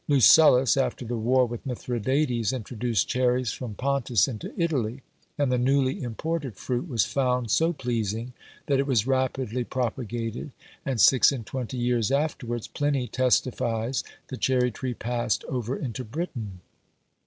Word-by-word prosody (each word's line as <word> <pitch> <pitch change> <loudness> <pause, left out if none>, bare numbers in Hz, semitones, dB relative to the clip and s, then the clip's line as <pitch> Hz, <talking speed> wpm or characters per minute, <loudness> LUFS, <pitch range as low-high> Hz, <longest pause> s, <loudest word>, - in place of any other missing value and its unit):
Lucullus, 135 -1 +6
after 125 -2 -1
the 120 +1 -3
war 125 +3 +3
with 120 -1 -6
Mithridates, 125 -1 -1
introduced 120 -4 -1
cherries 125 -1 +1
from 120 -5 -6
Pontus 130 -7 +1
into 110 -5 -6
Italy; 135 -7 -1 0.3
and 145 -3 +1
the 125 - +2
newly 135 +1 +1
imported 135 +1 -3
fruit 125 - -3
was 120 -8 +1
found 125 -4 0
so 165 +1 +3
pleasing, 120 - -3 0.3
that 140 -2 +1
it 140 - 0
was 120 -6 +2
rapidly 130 -2 0
propagated, 120 0 -3 0.3
and 130 -4 -1
six 130 +5 +6
and 125 -5 -5
twenty 130 +1 -5
years 120 -2 +1
afterwards 135 -5 -1
Pliny 145 -3 -1
testifies 125 -1 0 0.3
the 130 - -5
cherry 125 -1 +2
tree 125 +3 -4
passed 120 0 -1
over 125 +1 -3
into 130 -1 -4
Britain. 110 - -5
125 Hz, 140 wpm, -26 LUFS, 115-135 Hz, 0.3 s, Lucullus